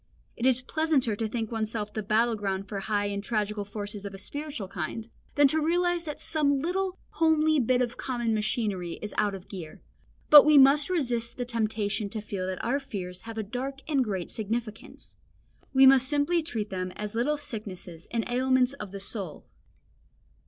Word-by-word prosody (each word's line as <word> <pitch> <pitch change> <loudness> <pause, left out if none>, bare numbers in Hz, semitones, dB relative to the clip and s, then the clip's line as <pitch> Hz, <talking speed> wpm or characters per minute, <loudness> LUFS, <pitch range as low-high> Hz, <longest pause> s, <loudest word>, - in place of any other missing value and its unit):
It 235 - 0
is 255 -1 +4
pleasanter 290 -7 +1
to 220 +1 -2
think 225 0 -3
oneself 215 -1 -3
the 215 - -2
battle 225 +3 +2
ground 195 -2 -3
for 200 - -4
high 205 +1 -1
and 200 0 -3
tragical 210 -1 -1
forces 205 0 -7
of 200 -1 -6
a - - -8
spiritual 285 +1 -5
kind, 190 +5 -5 0.3
than 290 -1 +6
to 315 +3 +1
realise 350 +2 +1
that 300 -2 -5
some 285 -3 +1
little 365 +5 -1
homely 315 -1 +3
bit 250 0 +2
of 240 0 -4
common 240 -3 -1
machinery 210 -5 -1
is 210 - -5
out 205 -2 +1
of 190 -1 -11
gear. 175 -6 -8 0.5
But 295 -1 +12
we 300 0 +6
must 280 +3 +6
resist 245 -9 -1
the 245 - -2
temptation 215 -3 -1
to 220 +1 -4
feel 200 -3 -4
that 185 -1 -4
our 265 +5 +1
fears 185 -9 -6
have 225 - -7
a 220 - -1
dark 260 +6 -5
and 285 -4 +2
great 190 -6 -3
significance. 220 0 -5 0.5
We 265 0 +6
must 265 -1 +7
simply 295 +4 +2
treat 225 -10 -4
them 185 -1 -3
as 210 -1 -5
little 260 +7 +1
sicknesses 190 - -7
and 230 -1 -1
ailments 255 +1 +2
of 210 -8 -8
the 200 - -6
soul. 195 -4 -2
230 Hz, 185 wpm, -28 LUFS, 205-275 Hz, 0.5 s, But